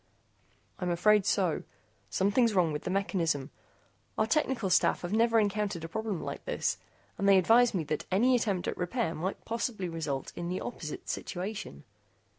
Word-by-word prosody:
"I'm 180 Hz, -, -1 dB
afraid 195 Hz, +4 st, +3 dB
so. 180 Hz, -6 st, +1 dB, 0.5 s
Something's 205 Hz, -, +2 dB
wrong 175 Hz, -4 st, +3 dB
with 150 Hz, -, -4 dB
the -, -, -1 dB
mechanism. 170 Hz, -8 st, 0 dB, 0.7 s
Our 220 Hz, -, +3 dB
technical 255 Hz, -7 st, 0 dB
staff 180 Hz, -, +3 dB
has 175 Hz, +3 st, -3 dB
never 230 Hz, +1 st, +4 dB
encountered 205 Hz, -4 st, -1 dB
a -, -, -4 dB
problem 215 Hz, 0 st, -3 dB
like -, -, -5 dB
this, -, -, -1 dB, 0.4 s
and 200 Hz, -, +3 dB
they 195 Hz, -, +7 dB
advise 230 Hz, +5 st, +5 dB
me 170 Hz, -, 0 dB
that 155 Hz, 0 st, -3 dB
any 245 Hz, +7 st, +4 dB
attempt 205 Hz, -6 st, 0 dB
at -, -, -2 dB
repair 180 Hz, 0 st, -1 dB
might 185 Hz, +5 st, -4 dB
possibly 225 Hz, -4 st, -2 dB
result 155 Hz, -5 st, -4 dB
in 175 Hz, 0 st, -4 dB
the 185 Hz, -, -2 dB
opposite 160 Hz, -10 st, -6 dB
situation." 185 Hz, -, -5 dB
195 Hz, 165 wpm, -30 LUFS, 170-220 Hz, 0.7 s, they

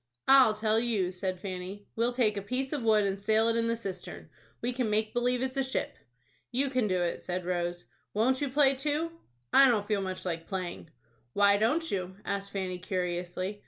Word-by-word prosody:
"I'll 265 Hz, -5 st, +7 dB
tell 215 Hz, +1 st, +2 dB
you," 215 Hz, -6 st, 0 dB
said 185 Hz, 0 st, -3 dB
Fanny, 190 Hz, +2 st, -6 dB
"we'll 235 Hz, +2 st, +1 dB
take 235 Hz, -4 st, +2 dB
a 200 Hz, -, -3 dB
piece 255 Hz, +7 st, -2 dB
of 290 Hz, -, -1 dB
wood, 215 Hz, -2 st, +3 dB
and 195 Hz, 0 st, -1 dB
sail 220 Hz, +2 st, +3 dB
it 230 Hz, -, +1 dB
in 230 Hz, 0 st, +1 dB
the 230 Hz, -, +1 dB
cistern. 195 Hz, -5 st, -7 dB, 0.3 s
We 245 Hz, +1 st, -2 dB
can 245 Hz, -3 st, -1 dB
make 215 Hz, +1 st, 0 dB
believe 245 Hz, +1 st, +1 dB
it's 260 Hz, +1 st, -3 dB
a 270 Hz, -, +2 dB
ship." 265 Hz, +1 st, -2 dB, 0.6 s
"You 265 Hz, +2 st, 0 dB
can 255 Hz, -4 st, +1 dB
do 185 Hz, -2 st, +1 dB
it," 170 Hz, -, -2 dB
said 180 Hz, 0 st, -3 dB
Rose. 175 Hz, -1 st, -2 dB, 0.3 s
"Won't 255 Hz, +6 st, +1 dB
you 285 Hz, -, 0 dB
play 275 Hz, 0 st, +4 dB
too?" 300 Hz, +4 st, -1 dB, 0.4 s
"I 275 Hz, -, +8 dB
don't 210 Hz, -4 st, +1 dB
feel 210 Hz, -2 st, +1 dB
much 185 Hz, -1 st, -4 dB
like 165 Hz, -2 st, -3 dB
playing." 185 Hz, -4 st, -5 dB, 0.4 s
"Why 200 Hz, 0 st, +5 dB
don't 300 Hz, +11 st, +1 dB
you?" 185 Hz, -1 st, -3 dB
asked 200 Hz, 0 st, -2 dB
Fanny, 185 Hz, -2 st, -3 dB
curiously. 180 Hz, +1 st, -3 dB
210 Hz, 200 wpm, -29 LUFS, 185-250 Hz, 0.6 s, I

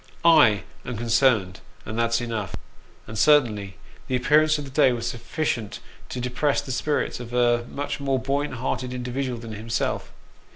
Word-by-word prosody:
/ -, -, -21 dB
am 145 Hz, -, +6 dB, 0.2 s
concerned, 115 Hz, -5 st, +1 dB, 0.3 s
and 110 Hz, -, -5 dB
that's 115 Hz, +1 st, +1 dB
enough; 115 Hz, -4 st, -3 dB, 0.3 s
" -, -, -29 dB
and 110 Hz, -1 st, -5 dB
certainly 105 Hz, -10 st, +3 dB, 0.3 s
the 130 Hz, -, 0 dB
appear 150 Hz, +5 st, +4 dB
ance 155 Hz, 0 st, +2 dB
of 145 Hz, -, -5 dB
the 135 Hz, -, -10 dB
day 135 Hz, -1 st, +4 dB
was 120 Hz, -1 st, -3 dB
sufficient 120 Hz, -3 st, -3 dB, 0.3 s
to 125 Hz, -, -5 dB
depress 125 Hz, +4 st, 0 dB
the 130 Hz, -, -5 dB
spirits 145 Hz, +1 st, -1 dB
of 120 Hz, -1 st, -8 dB
a 120 Hz, -1 st, +2 dB
much 145 Hz, +1 st, -4 dB
more 135 Hz, -1 st, 0 dB
buoyant 135 Hz, +2 st, -1 dB
hearted 125 Hz, +1 st, -3 dB
individual 125 Hz, 0 st, -3 dB
than 115 Hz, -1 st, -8 dB
himself. 110 Hz, +2 st, -2 dB
125 Hz, 170 wpm, -24 LUFS, 115-140 Hz, 0.3 s, am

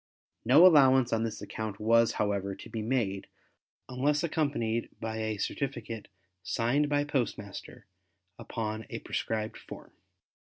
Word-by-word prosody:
No 170 Hz, -, +7 dB
allowance 135 Hz, -8 st, +6 dB
on 115 Hz, -, +1 dB
this 115 Hz, -1 st, -3 dB
account 110 Hz, -2 st, -5 dB
was, 115 Hz, +1 st, +4 dB
however, 100 Hz, -2 st, -1 dB
to -, -, -11 dB
be 110 Hz, -, -3 dB
made 105 Hz, -5 st, -1 dB, 0.6 s
unless 145 Hz, +4 st, 0 dB
accompanied 140 Hz, -8 st, -1 dB
by 110 Hz, 0 st, -4 dB
a 110 Hz, -1 st, -2 dB
certificate 115 Hz, -2 st, -4 dB, 0.3 s
signed 125 Hz, +9 st, +1 dB
by 145 Hz, 0 st, +2 dB
postmaster 120 Hz, -8 st, -4 dB, 0.5 s
upon 110 Hz, -1 st, -4 dB
a -, -, -4 dB
prescribed 110 Hz, -1 st, -3 dB
form. -, -, -11 dB
115 Hz, 125 wpm, -30 LUFS, 110-135 Hz, 0.6 s, No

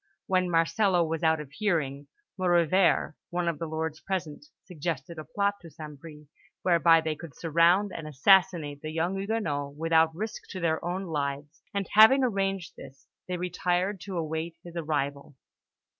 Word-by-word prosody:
When 185 Hz, -3 st, +1 dB
Marcello 175 Hz, +2 st, +2 dB
was 160 Hz, -1 st, -3 dB
out 160 Hz, -1 st, +3 dB
of 145 Hz, -2 st, -8 dB
hearing, 145 Hz, -6 st, -1 dB, 0.3 s
Maurevert, 175 Hz, -2 st, +2 dB, 0.2 s
one 175 Hz, 0 st, -2 dB
of 165 Hz, -3 st, -1 dB
the 165 Hz, -, -3 dB
lords 160 Hz, 0 st, -3 dB
present, 185 Hz, -, -4 dB, 0.2 s
suggested 165 Hz, -2 st, -5 dB
a -, -, -6 dB
plot 200 Hz, +4 st, -1 dB
to 170 Hz, -, -11 dB
St. 150 Hz, -1 st, -10 dB
Bris, 150 Hz, -1 st, -12 dB, 0.4 s
whereby 170 Hz, -2 st, +5 dB
they 160 Hz, -1 st, -2 dB
could 160 Hz, -2 st, -11 dB
surround 170 Hz, +5 st, +3 dB
and 155 Hz, -, -6 dB
assassinate 155 Hz, -1 st, +3 dB
the 155 Hz, -, -5 dB
young 165 Hz, +4 st, -1 dB
Huguenot 165 Hz, -10 st, -2 dB
without 160 Hz, 0 st, +2 dB
risk 215 Hz, +4 st, -6 dB
to 185 Hz, -, -6 dB
their 160 Hz, -2 st, 0 dB
own 180 Hz, +2 st, -2 dB
lives; 145 Hz, -1 st, -4 dB
and 200 Hz, -2 st, -2 dB
having 220 Hz, +6 st, +7 dB
arranged 195 Hz, -, -1 dB
this, 135 Hz, 0 st, -13 dB, 0.2 s
they 180 Hz, -1 st, -2 dB
retired 180 Hz, +2 st, -1 dB
to 190 Hz, -3 st, -5 dB
await 160 Hz, +1 st, -3 dB
his 175 Hz, -1 st, -11 dB
arrival. 145 Hz, -4 st, -3 dB
165 Hz, 160 wpm, -28 LUFS, 155-185 Hz, 0.4 s, having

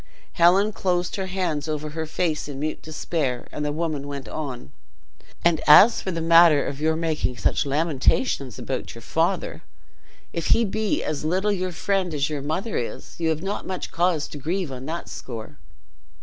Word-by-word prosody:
Helen 190 Hz, +5 st, +4 dB
closed 180 Hz, -2 st, 0 dB
her 190 Hz, -1 st, -2 dB
hands 175 Hz, -5 st, -2 dB
over 150 Hz, 0 st, -3 dB
her 160 Hz, +1 st, -4 dB
face 155 Hz, -1 st, -1 dB
in 140 Hz, -2 st, -6 dB
mute 155 Hz, +2 st, -3 dB
despair, 155 Hz, -5 st, -3 dB
and 150 Hz, -, -4 dB
the 150 Hz, -, 0 dB
woman 155 Hz, -2 st, -2 dB
went 140 Hz, -1 st, -6 dB
on: 130 Hz, -, -6 dB, 0.7 s
"And 170 Hz, -2 st, +4 dB
as 200 Hz, +10 st, +8 dB
for -, -, -4 dB
the 165 Hz, -2 st, -2 dB
matter 165 Hz, -3 st, +6 dB
of 140 Hz, +1 st, -5 dB
your 160 Hz, +1 st, +2 dB
making 160 Hz, -6 st, -1 dB
such -, -, +1 dB
lamentations 140 Hz, -, +1 dB
about -, -, -4 dB
your -, -, -11 dB
father, -, -, -1 dB, 0.7 s
if 165 Hz, -2 st, -2 dB
he 230 Hz, -, +4 dB
be 215 Hz, +1 st, -1 dB
as 150 Hz, -1 st, -3 dB
little 185 Hz, +6 st, +1 dB
your 185 Hz, -2 st, -1 dB
friend 185 Hz, -1 st, -1 dB
as 145 Hz, +1 st, 0 dB
your 145 Hz, -2 st, -3 dB
mother 170 Hz, +10 st, -2 dB
is 120 Hz, -, -5 dB
you 165 Hz, -1 st, +1 dB
have 160 Hz, +1 st, -1 dB
not 200 Hz, +2 st, -3 dB
much 185 Hz, -1 st, -4 dB
cause 170 Hz, -3 st, +1 dB
to 145 Hz, -, -8 dB
grieve 170 Hz, +2 st, -2 dB
on 130 Hz, +1 st, -7 dB
that 170 Hz, +2 st, -4 dB
score." 110 Hz, -11 st, -8 dB
160 Hz, 180 wpm, -24 LUFS, 145-180 Hz, 0.7 s, as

